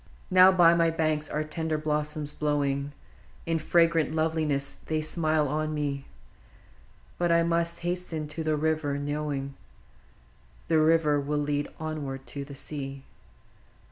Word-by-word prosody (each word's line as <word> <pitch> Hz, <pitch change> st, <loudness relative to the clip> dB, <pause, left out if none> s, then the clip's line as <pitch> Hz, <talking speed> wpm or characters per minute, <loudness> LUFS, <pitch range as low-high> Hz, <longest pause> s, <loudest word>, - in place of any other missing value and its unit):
Now 185 Hz, +1 st, +8 dB
by 175 Hz, -3 st, +6 dB
my 165 Hz, -1 st, +3 dB
banks 155 Hz, -2 st, 0 dB
are 150 Hz, -, -1 dB
tender 155 Hz, 0 st, -2 dB
blossoms 150 Hz, -1 st, -2 dB
blowing: 145 Hz, -2 st, -1 dB, 0.5 s
In 165 Hz, -1 st, 0 dB
fragrant 165 Hz, -1 st, +2 dB
loveliness 155 Hz, -3 st, 0 dB
they 155 Hz, -1 st, 0 dB
smile 155 Hz, -1 st, 0 dB
on 155 Hz, +2 st, -1 dB
me, 140 Hz, -2 st, -3 dB, 0.5 s
— -, -, -29 dB
But 175 Hz, -1 st, +2 dB
I 170 Hz, 0 st, +4 dB
must 170 Hz, 0 st, 0 dB
hasten 175 Hz, -3 st, -3 dB
to 160 Hz, +2 st, -5 dB
the 155 Hz, -1 st, +1 dB
river, 155 Hz, -2 st, 0 dB
knowing 145 Hz, -1 st, -3 dB, 1.2 s
The 160 Hz, -1 st, +4 dB
river 155 Hz, -2 st, +3 dB
leadeth 145 Hz, 0 st, -1 dB
ever 155 Hz, -4 st, -4 dB
to 135 Hz, +1 st, -7 dB
the 140 Hz, 0 st, -10 dB
sea. 135 Hz, -1 st, -6 dB
155 Hz, 135 wpm, -27 LUFS, 145-160 Hz, 1.2 s, Now